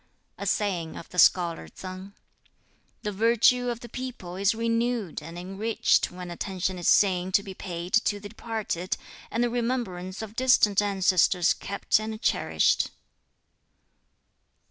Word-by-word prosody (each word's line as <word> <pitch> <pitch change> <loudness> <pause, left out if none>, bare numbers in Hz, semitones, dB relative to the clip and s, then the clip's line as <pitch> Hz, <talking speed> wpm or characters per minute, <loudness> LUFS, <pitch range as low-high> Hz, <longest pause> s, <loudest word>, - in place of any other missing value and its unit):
A 200 - -4
saying 180 -6 -1
of - - -10
the 180 - -3
Scholar 170 - +4
Tsang: 185 - -9 0.9
"The 210 - -2
virtue 235 +4 +3
of 240 0 -4
the 240 - -8
people 240 -8 -7
is 200 +3 +2
renewed 230 -4 -1
and 165 +1 -9
enriched 195 +5 +1
when 180 -1 -8
attention 185 +1 -3
is 175 - -2
seen 185 -2 +4
to 200 - +4
be 195 - -7
paid 175 -1 -6
to 220 -2 +2
the 205 - -8
departed, 220 -5 -3 0.3
and 235 - 0
the 240 - +1
remembrance 230 -6 -2
of 220 0 -9
distant 225 -6 +4
ancestors 190 -3 +3
kept 200 - 0
and 215 0 -5
cherished." - - +2
200 Hz, 140 wpm, -27 LUFS, 180-230 Hz, 0.9 s, Scholar